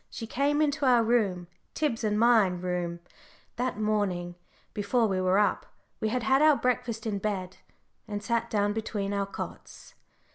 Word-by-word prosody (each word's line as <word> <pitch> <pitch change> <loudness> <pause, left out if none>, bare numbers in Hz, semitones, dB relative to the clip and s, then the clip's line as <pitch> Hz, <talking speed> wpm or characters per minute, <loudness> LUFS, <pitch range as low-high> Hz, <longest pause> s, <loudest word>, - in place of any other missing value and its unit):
She 225 - -6
came 285 +6 +1
into 290 -2 0
our 240 -2 +5
room 205 -7 +1 0.3
Tib's 275 -7 -1
and 210 -1 +1
my 230 -3 +5
room 180 -1 -3 0.6
that 250 -3 -2
morning 200 -5 -1 0.4
before 225 +3 +1
we 190 -3 0
were 185 +1 +2
up 210 - +1 0.3
we 220 - 0
had 250 +1 -1
had 265 +3 +3
our 305 -1 +6
breakfast 245 -3 -1
in 205 -3 -2
bed 190 -3 -3 0.5
and 205 -1 -5
sat 230 +2 -1
down 205 -1 +1
between 205 -2 -3
our 200 -1 -1
cots. 200 - -9
215 Hz, 160 wpm, -28 LUFS, 195-240 Hz, 0.6 s, our